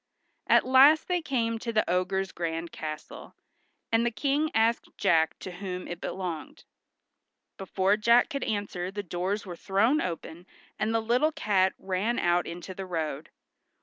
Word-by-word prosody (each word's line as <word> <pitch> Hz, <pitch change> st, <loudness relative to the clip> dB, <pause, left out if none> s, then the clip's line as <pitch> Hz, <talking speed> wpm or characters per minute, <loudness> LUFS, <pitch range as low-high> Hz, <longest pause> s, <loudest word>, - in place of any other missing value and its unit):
At -, -, +5 dB
last 270 Hz, +4 st, +6 dB
they 360 Hz, -1 st, 0 dB
came 230 Hz, -6 st, -1 dB
to 230 Hz, -, -3 dB
the 215 Hz, -1 st, +1 dB
ogre's 185 Hz, +2 st, 0 dB
grand 165 Hz, 0 st, -4 dB
castle, 155 Hz, -1 st, -8 dB, 0.6 s
and 225 Hz, 0 st, +3 dB
the 240 Hz, -, +2 dB
King 280 Hz, +7 st, 0 dB
asked 225 Hz, +1 st, +2 dB
Jack 160 Hz, -1 st, +2 dB
to 185 Hz, -, -8 dB
whom 180 Hz, 0 st, -6 dB
it 175 Hz, 0 st, -7 dB
belonged. 175 Hz, -5 st, -5 dB, 0.9 s
Before 195 Hz, +1 st, +1 dB
Jack 235 Hz, +2 st, +4 dB
could 275 Hz, -2 st, -3 dB
answer 200 Hz, -4 st, -3 dB
the 205 Hz, +1 st, -5 dB
doors 185 Hz, +4 st, -3 dB
were 180 Hz, -2 st, -7 dB
thrown 210 Hz, -, +2 dB
open, 170 Hz, 0 st, -6 dB, 0.3 s
and 215 Hz, +1 st, 0 dB
the 225 Hz, 0 st, +1 dB
little 250 Hz, +8 st, +2 dB
cat 190 Hz, -8 st, +1 dB
ran 195 Hz, +5 st, -1 dB
out 175 Hz, 0 st, +1 dB
into 175 Hz, +2 st, -7 dB
the 190 Hz, 0 st, -7 dB
road. 155 Hz, -4 st, -3 dB
195 Hz, 155 wpm, -28 LUFS, 175-230 Hz, 0.9 s, last